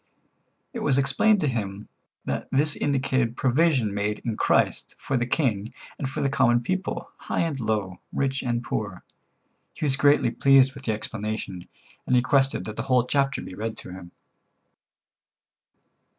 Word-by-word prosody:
It - - -4
was 135 -2 +2
explained 140 +10 +3
to 150 - +1
him 105 -5 -3 0.4
that - - -3
this 145 +2 +3
indicated 130 -4 0
provision 130 -5 +2
made 105 +1 -1
in 115 -3 -1
Christ - - +1
for 135 - -3
the 120 -1 0
king 115 -7 -1 0.2
and 135 - -2
for - - -4
the - - +2
common 120 -3 +3
people, 185 +7 -3
high - - -2
and 160 -5 -1
low, 105 -5 -2
rich 135 0 -1
and 120 -1 -1
poor. 105 -5 -4 0.7
He - - -3
was 135 -2 +2
greatly 145 -3 +4
pleased 135 +1 +5
with 140 -1 -12
the 110 - +1
explanation, 105 -4 -5 0.4
and 125 - +3
requested 135 +2 +2
that 110 0 -7
the - - -1
whole 125 -2 +4
chapter 140 +1 0
be - - -9
read 110 +3 -4
to - - -8
him. 90 -1 -10
125 Hz, 160 wpm, -25 LUFS, 110-140 Hz, 0.7 s, pleased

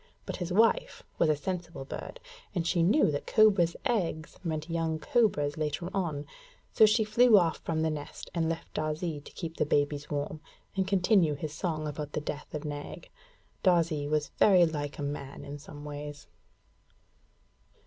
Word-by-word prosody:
But - - -4
his 175 0 -4
wife 225 +5 +2 0.2
was 165 - +4
a 155 - +4
sensible 170 -3 -5
bird, - - -7 0.4
and 170 -2 0
she 175 0 +2
knew 200 - +4
that 145 - -4
cobra's 195 -6 +4
eggs 170 -8 -1
meant 155 -2 -3
young 165 -1 -1
cobras 155 -8 +1
later 155 +3 -2
on; 160 -7 -2 0.5
so 220 - +7
she 220 +1 +3
flew 220 +1 +6
off 170 -4 +2
from 160 -1 -1
the 160 - +1
nest, 145 -1 -7
and 165 -2 0
left 165 0 -5
Darzee 155 0 -2
to - - -13
keep 165 -2 -6
the - - +3
babies 145 0 0
warm, 150 +1 -3 0.3
and 190 -1 0
continue 185 -4 +3
his 150 +1 -5
song 155 -1 -2
about 150 0 -5
the - - 0
death 150 -1 -6
of 150 +1 -4
Nag. 145 -1 -6 0.5
Darzee 165 -5 +2
was 150 0 0
very 185 -4 +7
like 145 -3 -3
a 145 - -4
man 140 -1 -5
in 145 +1 -7
some 145 0 -10
ways. 145 0 -7
160 Hz, 170 wpm, -29 LUFS, 150-180 Hz, 0.5 s, so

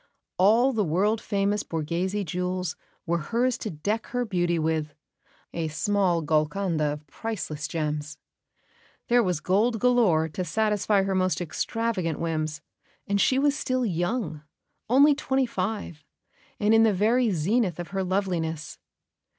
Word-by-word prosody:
All 230 +8 +5
the 220 -3 +1
world 200 +6 +1
famous 200 +1 0
Borghese 170 +6 -2
jewels 180 0 -2 0.3
were 170 0 0
hers 235 +9 0
to 215 - -4
deck 205 +8 -3
her 245 0 -2
beauty 175 -4 0
with 155 -2 -1 0.6
a 165 -1 -2
small 175 +1 +1
Golconda 155 +2 0
of 150 0 -10
priceless 155 -5 -5
gems; 150 -1 -3 0.9
there 240 0 +5
was 180 -7 0
gold 215 +8 +1
galore 215 -10 +3
to 170 +4 -4
satisfy 210 +2 +1
her 195 0 -1
most 185 -1 +1
extravagant 185 0 -2
whims; 155 -2 -2 0.4
and 200 0 +1
she 260 - +3
was 285 +1 +3
still 255 -3 -1
young 175 -3 -2 0.5
only 280 +4 +6
twenty 270 -2 0
five 195 -7 -4 0.6
and 210 +1 +3
in 225 - +6
the 220 -3 +4
very 230 +5 +3
zenith 190 +2 +1
of 175 - -5
her 195 -1 -2
loveliness. 175 -5 -2
190 Hz, 140 wpm, -26 LUFS, 160-225 Hz, 0.9 s, only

